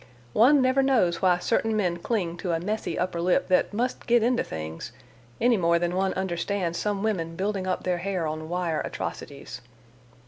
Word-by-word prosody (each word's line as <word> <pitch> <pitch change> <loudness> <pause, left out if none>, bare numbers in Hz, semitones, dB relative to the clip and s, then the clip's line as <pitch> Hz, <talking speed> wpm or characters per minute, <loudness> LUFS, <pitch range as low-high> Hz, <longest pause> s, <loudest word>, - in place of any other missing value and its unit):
One 265 +5 +5
never 260 +1 +3
knows 225 -11 +2
why 180 -2 +4
certain 225 +3 0
men 180 -4 0
cling 175 -3 -2
to 175 -2 -2
a 165 - 0
messy 210 +5 -3
upper 180 -2 -1
lip 180 +2 +1
that 185 - +3
must 240 +5 -2
get 240 -1 +4
into 245 +1 +2
things, 80 0 -6 0.5
any 240 -1 +4
more 170 -2 +3
than 175 +1 -1
one 190 0 0
understands 180 -1 -2
some 205 -1 -1
women 165 -7 -1
building 195 0 -2
up 185 - -1
their 180 -1 0
hair 185 -2 -2
on 155 +1 -4
wire 175 -3 -1
atrocities. 140 -3 -6
185 Hz, 180 wpm, -26 LUFS, 170-215 Hz, 0.5 s, One